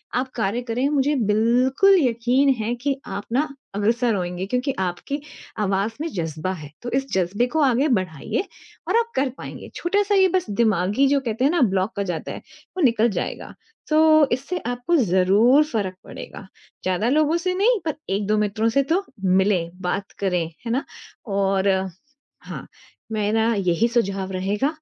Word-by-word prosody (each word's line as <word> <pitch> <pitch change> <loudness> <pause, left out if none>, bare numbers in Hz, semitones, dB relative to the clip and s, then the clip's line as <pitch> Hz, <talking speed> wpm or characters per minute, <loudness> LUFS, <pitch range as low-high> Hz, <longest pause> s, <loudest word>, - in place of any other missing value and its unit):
आप 255 +2 0
कार्य 225 +2 -1
करें। 245 +4 0
मुझे 290 0 +1 0.2
बिल्कुल 250 - +4
यकीन 245 +4 +2
है 225 +3 -1
कि 280 -1 +1
आप 205 - -5
ना 290 +5 +2 0.3
अग्रसर 230 +3 +1
होएँगे 180 0 -3
क्योंकि 250 +6 -1
आपकी 190 +11 -3 0.4
आवाज़ 200 +2 0
में 325 - -1
जज़्बा 165 0 -3
है, 155 -5 -9
तो 240 - -5
इस 270 - -2
जज़्बे 190 +5 +1
को 315 - +3
आगे 265 +2 +3
बढ़ाइए 185 - -3 0.4
और - - +2
आप 465 0 0
कर 270 0 +1
पाएँगे - - -9
छोटा-सा 405 +3 +1
ये 380 -1 +5
बस 360 - 0
दिमागी 210 +4 +2
जो 280 +1 +3
कहते 240 -2 -3
हैं 285 - +4
ना 345 -4 +1
ब्लॉक 190 +2 0
हो - - +1
जाता 175 -5 -4
है, - - -7 0.4
वो 360 - +1
निकल 235 -2 +4
जाएगा। - - -4 0.4
तो 310 -1 +5
इससे 280 +9 -2
आपको 245 +7 0
ज़रूर 210 - +4
फ़र्क 205 -10 -3
पड़ेगा, 195 - -10 0.4
ज़्यादा 185 +6 0
लोगों 310 +3 +3
से 365 - +2
नहीं 435 +4 +3
पर 310 - -1
एक-दो 205 +2 0
मित्रों 210 +2 +1
से 275 - +5
तो 380 +3 +1 0.2
मिले 190 0 +3 0.2
बात 195 +2 -3
करें, 180 -4 0 0.2
है 230 - -2
ना? 260 +4 0 0.4
और 195 -2 +1 0.7
हाँ, - - -8 0.5
मेरा 220 +2 +1
यही 185 +4 +2
सुझाव 195 -5 -1
रहेगा 195 +7 0
230 Hz, 165 wpm, -23 LUFS, 195-275 Hz, 0.7 s, ये